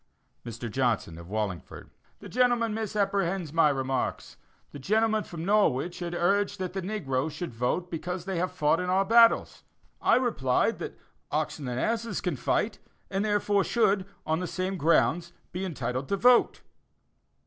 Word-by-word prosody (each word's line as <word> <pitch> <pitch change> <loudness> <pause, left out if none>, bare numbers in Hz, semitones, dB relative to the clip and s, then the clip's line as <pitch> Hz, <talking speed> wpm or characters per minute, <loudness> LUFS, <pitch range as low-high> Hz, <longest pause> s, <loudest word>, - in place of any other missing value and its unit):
Mr. 120 0 -6
Johnson, 115 -8 -1
of 85 +1 -11
Wallingford: 100 -5 -4 0.3
The - - -9
gentleman 240 -2 +2
misapprehends 195 -6 -1
my 165 -2 +5
remarks. 135 -2 -2 0.4
The 145 - -9
gentleman 220 +6 +1
from 165 -1 -7
Norwich 180 -6 +2
had 175 -1 -4
urged 200 +4 +1
that 185 -2 -4
the 190 - -3
negro 160 -8 -2
should 165 -3 -6
vote 125 +10 -1
because 175 +2 -4
they 190 -3 -2
have 180 +1 -1
fought 160 -2 +2
in 180 0 -2
our 190 +1 +2
battles. 230 +2 +4 0.4
I - - +4
replied 220 - +1
that - - -6 0.3
oxen 140 - -2
and 125 0 -2
asses 230 - -1
can 180 -4 -2
fight, 205 - -1 0.3
and 195 +1 0
therefore 205 -1 +2
should, 200 -5 +1 0.2
on 160 +1 0
the 180 - -3
same 185 +2 -2
grounds, 170 +1 +2 0.2
be 180 +2 -4
entitled 130 -7 -3
to 200 - +1
vote. 245 +4 +4
180 Hz, 160 wpm, -28 LUFS, 140-205 Hz, 0.4 s, my